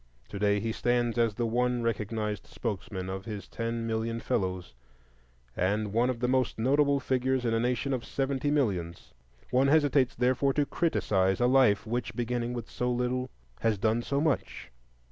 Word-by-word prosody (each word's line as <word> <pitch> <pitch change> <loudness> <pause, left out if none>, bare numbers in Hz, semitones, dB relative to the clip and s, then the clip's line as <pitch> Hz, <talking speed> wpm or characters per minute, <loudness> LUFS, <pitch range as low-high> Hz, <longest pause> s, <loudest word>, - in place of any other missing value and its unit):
To 100 - -6
day 100 0 +2
he 110 +2 -2
stands 120 0 0
as 115 -3 +2
the 120 - -1
one 120 +1 0
recognized 105 -1 -2
spokesman 95 -4 -4
of 95 +1 -5
his 105 -3 -6
ten 115 0 -3
million 115 0 -2
fellows, 90 - -2 0.8
and 100 +3 0
one 120 +3 +3
of 125 -2 -2
the 125 - +2
most 130 -1 +1
notable 140 +4 +3
figures 130 -1 0
in 115 - +1
a 115 - +2
nation 125 +3 0
of 125 -3 -2
seventy 135 +2 -1
millions. 95 - -1 0.4
One 130 +2 +4
hesitates, 145 -3 +3
therefore, 130 +3 +2
to 145 +1 +2
criticise 95 - +1
a 120 - +3
life 125 -5 +4
which, 120 +1 -3
beginning 120 0 -2
with 120 -2 -5
so 125 - -2
little, 125 +1 -1 0.3
has 110 -2 +1
done 110 +4 +1
so 140 +3 -1
much. 150 - -1
120 Hz, 170 wpm, -29 LUFS, 110-130 Hz, 0.8 s, One